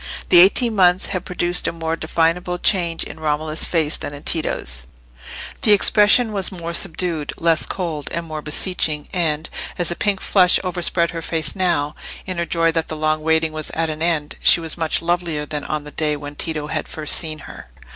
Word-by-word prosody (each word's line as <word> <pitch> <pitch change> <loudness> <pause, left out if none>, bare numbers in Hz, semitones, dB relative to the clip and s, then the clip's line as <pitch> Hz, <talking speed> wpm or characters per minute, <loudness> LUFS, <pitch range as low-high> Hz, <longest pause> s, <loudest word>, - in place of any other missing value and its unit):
The 175 - +8
eighteen 220 +5 +5
months 180 -1 +3
had 185 - -4
produced 175 0 -1
a - - 0
more 165 -1 -3
definable 165 +2 0
change 175 -3 +1
in 160 - -9
Romola's 155 0 0
face 160 -3 0
than 145 - -6
in 145 - -12
Tito's; 60 - -1 0.7
the 210 - +5
expression 210 +3 +4
was 195 -3 +1
more 170 -2 -6
subdued, 165 -3 -1
less 165 -1 +2
cold, 165 -6 -4
and 170 0 -3
more 155 -1 -6
beseeching, 150 -1 0
and, 160 -3 0 0.3
as 175 - 0
the 175 - -1
pink 200 0 0
flush 180 -2 +4
overspread 175 -2 0
her 165 -1 -5
face 160 -2 -1
now, 170 -6 0 0.3
in 185 -2 -4
her 170 - -2
joy 165 0 +2
that 165 0 -2
the 155 - -6
long 155 0 0
waiting 160 0 +1
was 155 0 -4
at 160 0 0
an 155 0 -7
end, 160 -3 -1
she - - +6
was 165 -1 -1
much 165 -1 -1
lovelier 170 -3 -1
than 150 -1 -5
on 150 -1 -3
the 150 - -8
day 150 -1 -1
when 145 0 -8
Tito 155 0 -3
had - - -4
first 155 -1 +1
seen 155 -2 -1
her. 145 - -12
165 Hz, 195 wpm, -20 LUFS, 155-175 Hz, 0.7 s, The